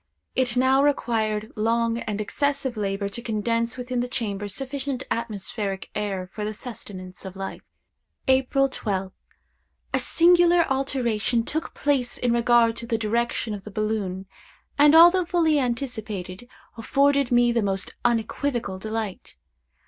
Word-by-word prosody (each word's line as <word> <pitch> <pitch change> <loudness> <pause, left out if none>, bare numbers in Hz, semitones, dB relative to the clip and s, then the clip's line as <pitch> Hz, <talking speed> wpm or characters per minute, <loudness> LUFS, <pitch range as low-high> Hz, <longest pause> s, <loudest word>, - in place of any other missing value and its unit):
It 250 -2 0
now 260 +2 +4
required 220 -6 0
long 230 +1 +1
and 210 -3 -4
excessive 275 +3 -1
labor 200 -1 -2
to 235 - -5
condense 230 +1 -1
within 250 0 -3
the 245 - -1
chamber 205 -5 -3
sufficient 270 +4 -4
atmospheric 210 -3 -3
air 195 -3 -3
for 210 - -5
the 215 +1 -2
sustenance 185 -6 -8
of 190 -1 -8
life. 195 0 -6 0.7
"April 265 +1 +3
12th. 195 -7 -4 0.7
A - - +3
singular 345 0 +5
alteration 245 -4 0
took 315 +7 -3
place 270 -4 0
in 245 -1 +1
regard 235 -1 +4
to 235 - -6
the 230 -2 0
direction 230 0 -1
of 200 -2 -7
the 210 - -8
balloon, 205 -3 -2 0.5
and 295 +1 +6
although 350 +3 +8
fully 330 -3 +2
anticipated, 235 -5 -4 0.3
afforded 275 +3 +2
me 240 0 +4
the 235 -1 +1
most 195 -1 -1
unequivocal 235 -3 -1
delight. 215 -1 -5
235 Hz, 135 wpm, -24 LUFS, 210-265 Hz, 0.7 s, although